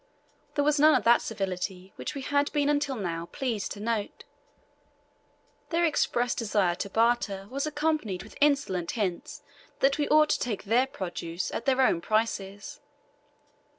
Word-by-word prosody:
There 290 - +2
was 300 0 +2
none 305 +1 +7
of - - +1
that 235 +1 +5
civility 190 -2 -4
we 290 -2 -5
had 285 +1 +1
been 290 -1 +2
until 290 -2 +1
now 170 -6 -4
pleased 230 -6 -3
to 205 - -11
note: 220 -1 -3 1.5
their 345 0 +2
express 245 -6 +1
desire 205 -6 +1
to 195 +3 -5
barter 225 -3 +1
was 275 +3 -2
accompanied 295 - -1
with 215 - -14
insolent 275 -13 +2
hints 185 -5 -3 0.4
that 275 +2 +2
we 290 - +1
ought 305 0 +5
to - - +1
take 225 -5 -3
their 240 +5 +2
produce 175 -6 -5
at - - -4
their 265 -1 +3
own 175 -10 +3
prices. 205 -2 -2
230 Hz, 150 wpm, -28 LUFS, 195-285 Hz, 1.5 s, none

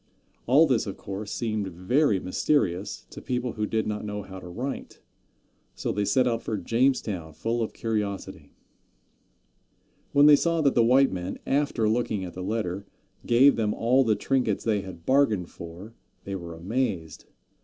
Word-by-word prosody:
All 140 +7 +6
this, 130 -7 +1
of 100 - -5
course, 100 +1 -6
seemed 110 -4 -2
very 95 - +1
mysterious 95 - 0
to - - -9
people 125 -1 -2
who 105 -1 -2
did 110 0 0
not 105 0 -3
know 105 -1 -4
how 95 -1 -9
to 90 - -10
write, 125 +10 -6 0.8
so - - -2
they 105 0 -1
set 130 +4 +3
out 115 -1 0
for 110 -2 -3
Jamestown 105 - 0
full 115 +7 -2
of 110 - -2
curiosity. 105 -3 -4 1.6
When 145 0 +6
they 150 0 +9
saw 165 +2 +1
that 140 -3 +3
the 120 - +4
white 130 +4 +5
men, 90 0 -4
after 135 -5 +1
looking 110 -3 0
at 90 - -8
the 90 - -7
letter, 100 -1 -3 0.4
gave 130 +4 +6
them 105 -2 0
all 125 +4 +3
the 110 -3 +2
trinkets 120 -1 0
they 105 -3 +1
had 90 -4 -10
bargained 110 -10 +2
for, 85 +6 -10 0.3
they 100 - -6
were 85 -3 -6
amazed. 90 - -3
110 Hz, 165 wpm, -26 LUFS, 95-125 Hz, 1.6 s, they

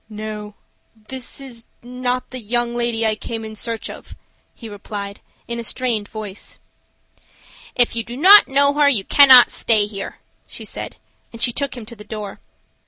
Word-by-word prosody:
"No; 210 -1 -7 0.4
this 240 +5 -6
is 245 -4 -9 0.2
not 250 +1 -3
the 255 - -6
young 240 +1 -2
lady 235 -1 -1
I 220 - +2
came 225 +1 -6
in 220 0 -8
search 230 +1 -3
of," - - -11 0.4
he 230 - -10
replied, 200 -1 -8 0.3
in 235 0 -4
a - - -4
strained 230 -4 -2
voice. 210 -3 -8 1.2
"If 245 -1 +3
you 230 - -2
do 240 +2 -9
not 390 +7 +8
know 280 +1 +4
her 290 -1 +4
you 225 -8 +1
cannot 265 -1 +8
stay 215 -3 +2
here," 200 -1 -7 0.3
she - - -8
said, - - -7 0.4
and 230 - -11
she 240 +1 +2
took 280 -1 -3
him 235 - -8
to 235 +2 -11
the 210 - -12
door. 210 -2 -8
230 Hz, 170 wpm, -20 LUFS, 215-250 Hz, 1.2 s, not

